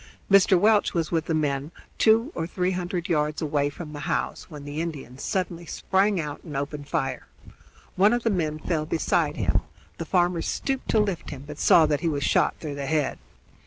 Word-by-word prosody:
Mr. 195 -2 +6
Welch 210 0 +3
was 165 -2 0
with 165 -2 0
the 165 - -1
men, 145 -2 -1 0.3
two 230 +6 +4
or 165 - -3
three 180 +1 -1
hundred 180 0 -3
yards 150 -3 0
away 145 -2 0
from 150 +1 -9
the 145 - -6
house, - - -2
when 150 -3 -9
the 145 +2 -3
Indians 140 -6 -6
suddenly 175 -3 -2
sprang 195 0 +1
out 150 -2 -5
and 150 -5 -6
opened 145 +1 -4
fire. 135 -1 -2 0.7
One 200 +3 +5
of 240 0 0
the 230 - +2
men 155 -5 -1
fell 155 -1 -2
beside 160 -1 +1
him; 90 -7 +1 0.4
the 165 - -3
farmer 175 0 +2
stooped 270 +9 -2
to 220 - +3
lift 200 -6 -1
him, 140 -2 -7
but 150 0 -9
saw 165 - +6
that 150 -2 +1
he 170 - +1
was 145 -2 -2
shot - - +2
through 150 -3 -5
the 140 -1 -4
head. 150 -2 0
160 Hz, 200 wpm, -25 LUFS, 145-180 Hz, 0.7 s, Mr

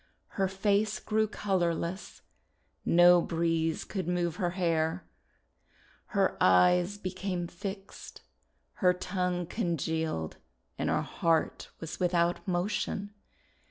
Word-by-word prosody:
Her 195 -2 0
face 205 +2 +1
grew 220 0 +1
color 185 -5 0
less. 175 +4 -6 0.6
No 175 0 +6
breeze 165 -1 0
could 190 -4 -4
move 175 -2 0
her 180 -4 0
hair. 165 -1 0 1.0
Her - - +1
eyes 175 - +4
became 185 -2 -3
fixed. 195 +3 -8 0.6
Her 180 -2 +5
tongue 180 -1 -2
congealed 160 - -2 0.4
and - - -2
her - - +1
heart 165 -1 0
was 165 - -7
without 175 -1 +1
motion. 200 +2 -1
180 Hz, 105 wpm, -30 LUFS, 170-195 Hz, 1.0 s, No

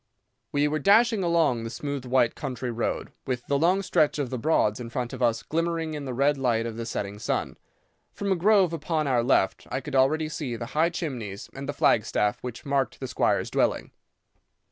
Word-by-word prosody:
"We 145 +1 +2
were 155 +1 -1
dashing 220 - +4
along 165 -9 +2
the 115 - -4
smooth 140 +1 -4
white 125 -2 +2
country 130 -3 -4
road, 115 0 -2 0.2
with 125 -2 -2
the 140 0 +1
long 185 +5 +3
stretch 155 -5 +2
of 140 -4 -2
the 130 - -2
Broads 115 -6 +2
in 120 -1 -6
front 120 0 -3
of - - -7
us 115 -2 +2
glimmering 165 0 -1
in 145 -2 -5
the 130 - -4
red 140 +2 +2
light 115 -3 +1
of 115 -1 -4
the 115 0 -5
setting 100 -2 -4
sun. - - -2 0.6
From 200 -1 -3
a - - +4
grove 190 -1 +4
upon 160 0 -1
our 130 -4 +2
left 115 -5 +1
I 130 - -2
could 135 - -8
already 155 +4 +3
see 150 -6 -4
the 115 - -5
high 160 +2 +3
chimneys 120 - -5
and 140 +1 -7
the - - +2
flag 110 -5 +3
staff 105 0 0
which 125 -1 -7
marked 140 -1 0
the 130 - -4
squire's - - 0
dwelling. - - 0
140 Hz, 210 wpm, -26 LUFS, 120-160 Hz, 0.6 s, dashing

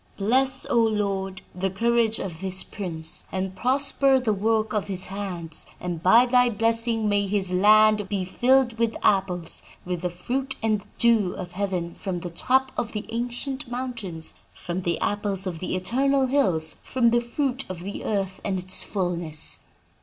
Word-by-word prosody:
Bless, 260 +6 +2
O 235 - +2
Lord, 195 -4 -1
the 190 +2 -1
courage 230 +2 +1
of 170 -3 -6
this 190 -1 -2
prince, 160 -5 -4
and 190 0 -3
prosper 270 +4 +3
the 235 -4 0
work 220 +2 0
of 210 -2 -1
his 185 -2 -1
hands; 180 -5 -5
and 175 -2 -4
by 225 +8 +6
thy 250 0 +4
blessing 230 0 +1
may 205 -1 +1
his 195 -2 0
land 210 +1 +5
be 195 -3 -1
filled 245 +3 +2
with 230 -1 +1
apples, 185 -4 +1 0.2
with 180 -1 -3
the 180 - -1
fruit 255 +10 -3
and 215 -3 0
dew 225 -6 +3
of 180 -2 -7
heaven 180 -3 -2
from 185 -4 -4
the 175 - -6
top 260 +8 +1
of 240 -1 -3
the 210 - -4
ancient 245 +3 -4
mountains, 230 -10 -5 0.2
from 175 +2 -4
the 170 -2 -1
apples 205 -2 0
of 175 -3 -4
the 185 - -3
eternal 265 +9 +2
hills, 185 - +1
from 235 -3 +1
the 240 0 +3
fruit 260 +2 -2
of 180 -2 -6
the 200 +3 -6
earth 195 -3 -2
and 195 -2 -1
its 185 +1 0
fullness!' 175 -5 +1
205 Hz, 170 wpm, -25 LUFS, 185-235 Hz, 0.2 s, by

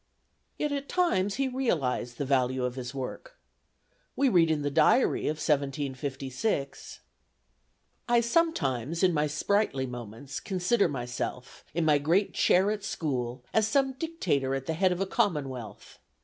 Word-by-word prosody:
Yet 300 - -1
at 280 0 -3
times 205 - +1
he 275 0 0
realized 150 - -1
the 140 - -2
value 130 -1 +1
of 125 - -2
his 125 -1 -6
work. - - -6 0.8
We 275 -1 +3
read 170 -6 +4
in 155 -2 0
the 145 - -1
diary 245 - +3
of 155 - -1
1756: 140 - -2 1.1
"I 240 0 +5
sometimes 170 - 0
in 180 -2 +4
my 150 -1 +1
sprightly 155 -2 0
moments 120 +2 -7
consider 195 +2 +1
myself, 125 -2 -5
in 170 -1 +1
my 150 -2 +4
great 170 +8 +1
chair 190 +3 +3
at 210 -2 -4
school, 125 -8 -3
as 220 -1 +3
some 270 +3 +2
dictator 185 - -1
at 135 0 -4
the 160 - -1
head 185 +3 +2
of 180 +1 -2
a - - +2
commonwealth. 140 - -2
155 Hz, 150 wpm, -28 LUFS, 130-210 Hz, 1.1 s, I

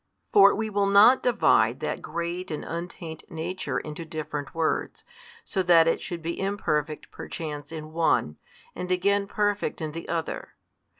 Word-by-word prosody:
For 200 -1 +7
we 220 +1 -2
will 200 -1 +2
not 205 +6 +7
divide 245 -2 +3
that - - -3
Great 170 +2 -4
and 155 - -4
Untaint 170 -1 -6
Nature 165 +3 -3
into 155 +2 -5
different 155 -2 -5
Words, 165 -1 -1 0.4
so 190 - -1
that 170 -2 +6
it 165 - +1
should 170 -2 -5
be 170 +1 -3
imperfect 155 -7 -2
perchance 150 -2 -6
in 155 -1 -7
one, 160 - +1 0.4
and 180 0 -5
again 200 +2 +2
Perfect 205 -1 -1
in 155 -2 -3
the 165 +2 -7
other. 165 -1 -3
170 Hz, 155 wpm, -26 LUFS, 160-195 Hz, 0.4 s, For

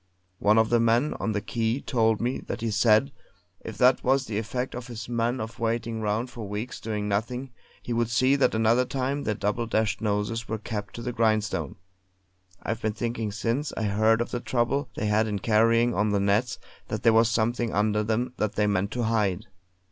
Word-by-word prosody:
One 105 +2 +4
of 110 0 +3
the 120 - +4
men 115 +6 +2
on 110 - -1
the 105 - -1
quay 115 +3 -1
told 115 -5 +1
me 125 +3 -1
that - - -4
he 115 -1 -1
said 110 +5 +3 0.5
if 110 - -8
that 125 +1 +4
was 135 +1 +2
the 105 -3 -2
effect 125 +3 -3
on 125 - -4
his 120 -2 -8
men 120 +1 -1
of 110 +1 -6
waiting 115 0 -1
round 110 +4 -1
for 115 -6 -7
weeks 105 +5 -5
doing 105 -2 -3
nothing, 125 +6 -2 0.3
he 120 - -3
would 115 -1 0
see 130 +4 +3
that 135 -5 +2
another 115 +3 +3
time 135 +2 -2
their 105 - 0
double 105 +4 -1
dashed 110 -1 0
noses 110 +2 -1
were 110 - -1
kept 105 -2 -6
to 115 - -6
the 125 0 -3
grindstone. 110 - 0 0.9
I've 110 +1 -3
been 110 -1 -1
thinking 115 -1 -3
since 115 +7 -2
I - - -1
heard 110 +2 +3
of 120 - -3
the 120 - -2
trouble 125 +4 -1
they 110 - -2
had 105 +1 +2
in 105 -1 -2
carrying 115 +3 +3
on 105 +1 +1
the 100 -1 +1
nets, 100 +4 +1 0.3
that - - -4
there 115 - +5
was 115 0 +5
something 115 +1 0
under 105 +1 +1
them 115 +3 -1
that 105 0 -1
they 105 - +2
meant 100 -1 +1
to 125 - -1
hide. 105 -5 0
115 Hz, 210 wpm, -26 LUFS, 105-120 Hz, 0.9 s, there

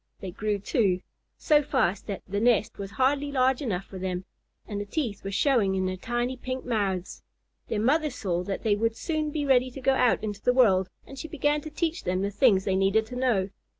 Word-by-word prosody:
They 190 - -6
grew, 210 +2 -1
too, 195 -2 +1 0.4
so 300 -2 +4
fast 250 - 0
that 200 -3 -5
the 200 +2 -2
nest 220 -3 +2
was 195 -1 -5
hardly 275 +6 +1
large 260 -1 +2
enough 195 -8 -2
for 190 - -9
them, 185 0 -3 0.4
and 205 -2 -4
the - - -4
teeth 225 -3 -3
were 195 - -4
showing 205 -2 +2
in 190 0 0
their 185 0 -1
tiny 240 +6 -2
pink 255 +1 -5
mouths. 200 -6 -2 0.5
Their 210 - -1
mother 300 +6 +2
saw 190 -9 -2
that 195 - -4
they 215 -3 +3
would 225 +2 0
soon 310 -2 -2
be 295 -1 -2
ready 260 -2 +3
to 255 - -9
go 270 +1 +2
out 250 -4 +2
into 210 -2 -4
the 250 - +2
world, 190 -8 +4 0.2
and 275 - -10
she 320 - -5
began 295 -1 0
to 310 - -7
teach 325 +2 -2
them 185 +1 -1
the 200 - -1
things 205 -4 +3
they 190 - +1
needed 195 +3 +2
to 245 - -9
know. 235 -7 +1
225 Hz, 220 wpm, -27 LUFS, 195-265 Hz, 0.5 s, so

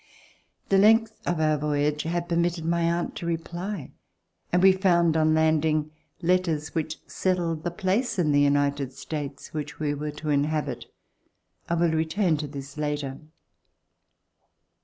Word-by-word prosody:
The 195 - +5
length 220 +2 +4
of 175 -2 0
our 155 -1 +2
voyage 150 0 0
had 170 +1 -2
permitted 170 -1 0
my 170 +1 +1
aunt 170 +1 0
to 170 - -5
reply, 170 0 -4 0.6
and 180 +1 +3
we 190 - +9
found, 175 -4 +3
on 155 0 +3
landing, 155 -1 +2 0.3
letters 170 -4 +1
which 160 -1 -2
settled 170 -4 -1
the 175 - 0
place 195 +7 -1
In 160 -5 +2
the 145 0 +4
United 140 -1 +1
States 145 -1 -6
which 150 -1 -5
we 150 -1 0
were 150 +1 -4
to 150 +1 -6
inhabit. 145 -4 -1 0.8
I 170 - +2
will 170 -1 +2
return 160 +3 +1
to 150 0 -4
this 140 0 -9
later. 145 -3 -2
160 Hz, 145 wpm, -26 LUFS, 150-175 Hz, 0.8 s, we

